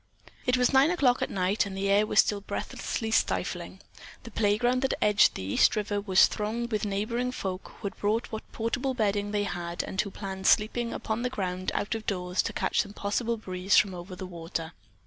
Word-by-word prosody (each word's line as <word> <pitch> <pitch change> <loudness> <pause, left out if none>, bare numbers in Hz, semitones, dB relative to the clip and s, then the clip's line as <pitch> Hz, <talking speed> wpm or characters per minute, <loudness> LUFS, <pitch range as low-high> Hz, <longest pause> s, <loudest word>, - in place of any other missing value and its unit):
It 250 0 +4
was 250 +2 +2
nine 270 +3 +6
o'clock 280 -8 +2
at - - 0
night 195 +2 +1
and 190 -1 -6
the 195 +1 -1
air 205 +2 +4
was - - +3
still 205 -1 -2
breathlessly 220 +2 -4
stifling. - - -1 0.4
The 230 - -10
playground 230 +5 +2
that 265 - +1
edged 210 0 +4
the 95 - -5
East 95 - +3
River 205 -1 -1
was 190 -2 +6
thronged 230 +3 -3
with 210 -1 0
neighboring 230 +5 -1
folk 190 -6 -5
who - - -11
had 195 - -4
brought 215 +3 0
what 220 - -7
portable 250 +4 -2
bedding 205 -3 0
they 205 0 0
had 175 -3 -3
and 190 - -1
who 205 - -5
planned 190 -1 -5
sleeping 230 +2 +3
upon 220 +1 -3
the 250 - 0
ground 185 -5 -3
out 205 - -1
of 220 -1 -5
doors 180 -2 0
to - - -3
catch - - +1
some 200 - -8
possible 230 +3 -1
breeze 185 -2 +1
from 195 -2 +4
over 180 +1 -8
the 190 - -6
water. 165 -2 -5
205 Hz, 205 wpm, -28 LUFS, 190-230 Hz, 0.4 s, nine